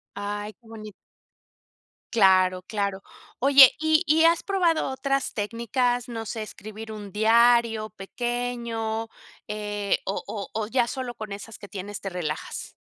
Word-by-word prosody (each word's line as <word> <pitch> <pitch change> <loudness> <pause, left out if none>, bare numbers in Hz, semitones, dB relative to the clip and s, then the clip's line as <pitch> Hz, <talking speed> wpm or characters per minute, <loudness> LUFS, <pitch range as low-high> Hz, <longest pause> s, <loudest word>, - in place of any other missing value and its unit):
Ay, 205 +1 -4
qué 225 +4 -24
boni 215 -1 -9 1.2
Claro, 185 -3 +4
claro. 200 -1 -3 0.3
Oye, 270 0 +8
¿y 315 0 +3
y 315 +2 +4
has 335 0 +4
probado 355 -7 +1
otras 275 +1 -1
técnicas, 235 +3 -1
no 225 -1 -5
sé, 220 0 -4
escribir 215 +1 -8
un 205 -2 -8
diario 225 0 +3
pequeño, 230 +1 -3 0.4
eh, 205 -1 -2
o 195 - -3
o 200 -3 -6
o 215 -1 -2
ya 240 +1 +1
solo 255 -1 -4
con 215 -3 -8
esas 205 +3 -8
que 205 - -10
tienes 200 +1 -7
te 195 - -4
relajas? 175 -5 -5
220 Hz, 140 wpm, -25 LUFS, 205-245 Hz, 1.2 s, Oye